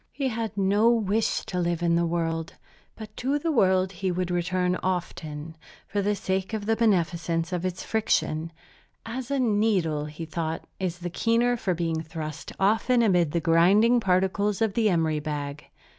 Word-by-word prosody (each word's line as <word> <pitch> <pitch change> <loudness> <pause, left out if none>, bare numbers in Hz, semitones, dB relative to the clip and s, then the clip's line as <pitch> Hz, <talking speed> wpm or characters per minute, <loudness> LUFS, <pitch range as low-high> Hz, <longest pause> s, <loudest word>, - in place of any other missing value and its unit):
He 275 -2 -2
had 225 -3 -4
no 200 +4 +3
wish 220 -2 +1
to 180 - -3
live 175 -1 -1
in 170 -1 +2
the 170 0 +2
world; 165 -1 -2 0.4
but 220 -1 -10
to 270 +4 0
the 325 +3 -1
world 190 -7 +3
he 190 +1 -3
would 180 0 -2
return 180 +1 0
often, 160 -4 -4 0.3
for 200 0 -1
the 205 +1 +1
sake 190 +1 -2
of 215 -2 -3
the 225 +1 +2
beneficence 170 -5 0
of 180 -1 -2
its 185 0 -5
friction, 165 -7 0 0.5
as 245 +2 -5
a 280 -1 0
needle, 205 - +1
he 150 +2 -7
thought, 160 0 -4
is 180 -2 -2
the 175 -1 -5
keener 235 +5 +2
for 195 -6 -1
being 165 -1 -1
thrust 155 -1 -7
often 225 +5 +3
amid 180 -7 +3
the 170 - +1
grinding 195 +9 +4
particles 195 +1 +1
of 220 -3 +1
the 220 -1 +2
emery 160 -4 +1
bag. 150 -1 -5
185 Hz, 175 wpm, -26 LUFS, 165-220 Hz, 0.5 s, grinding